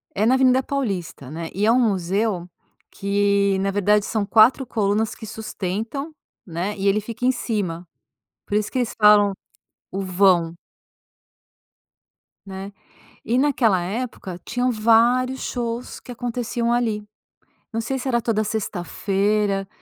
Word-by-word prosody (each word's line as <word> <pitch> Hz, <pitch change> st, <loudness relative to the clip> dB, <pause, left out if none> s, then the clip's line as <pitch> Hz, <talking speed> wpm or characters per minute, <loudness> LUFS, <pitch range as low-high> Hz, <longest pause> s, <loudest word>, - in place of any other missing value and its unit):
É 210 Hz, -, +1 dB
na 250 Hz, -, +5 dB
Avenida 260 Hz, 0 st, +4 dB
Paulista, 195 Hz, -, -3 dB
né. 165 Hz, +1 st, -5 dB
E, 205 Hz, +2 st, +1 dB
é 225 Hz, -, +5 dB
um 255 Hz, -, +4 dB
museu, 195 Hz, -2 st, 0 dB, 0.4 s
que 200 Hz, -1 st, +1 dB
na 195 Hz, +1 st, 0 dB
verdade 205 Hz, +1 st, +2 dB
são 215 Hz, -2 st, -1 dB
4 225 Hz, +5 st, +5 dB
colunas 215 Hz, 0 st, 0 dB
que 220 Hz, -, -10 dB
sustentam, 220 Hz, -, -4 dB, 0.3 s
né, 180 Hz, +4 st, -3 dB
e 195 Hz, +1 st, +1 dB
ele 205 Hz, +2 st, +3 dB
fica 230 Hz, +3 st, -7 dB
em 255 Hz, -, +4 dB
cima, 185 Hz, -9 st, -3 dB, 0.6 s
por 205 Hz, -, -3 dB
isso, 210 Hz, 0 st, 0 dB
que -, -, -3 dB
eles 240 Hz, -, -1 dB
falam, 210 Hz, -1 st, +6 dB, 0.6 s
o 195 Hz, -, -3 dB
vão. 180 Hz, -3 st, +2 dB, 1.9 s
Né, 195 Hz, +1 st, -7 dB, 0.5 s
e, 235 Hz, +3 st, 0 dB
naquela 250 Hz, -9 st, +3 dB
época, 195 Hz, -2 st, -5 dB
tinham 250 Hz, 0 st, 0 dB
vários 240 Hz, +4 st, +3 dB
shows 235 Hz, 0 st, -4 dB
que 250 Hz, -, -11 dB
aconteciam 240 Hz, 0 st, -2 dB
ali. 225 Hz, -3 st, 0 dB, 0.7 s
Não 225 Hz, -, -1 dB
sei 265 Hz, +3 st, -2 dB
se 260 Hz, -, -4 dB
era 240 Hz, -2 st, +2 dB
toda 220 Hz, -2 st, +1 dB
sexta-feira, 200 Hz, 0 st, -1 dB
210 Hz, 140 wpm, -22 LUFS, 195-235 Hz, 1.9 s, falam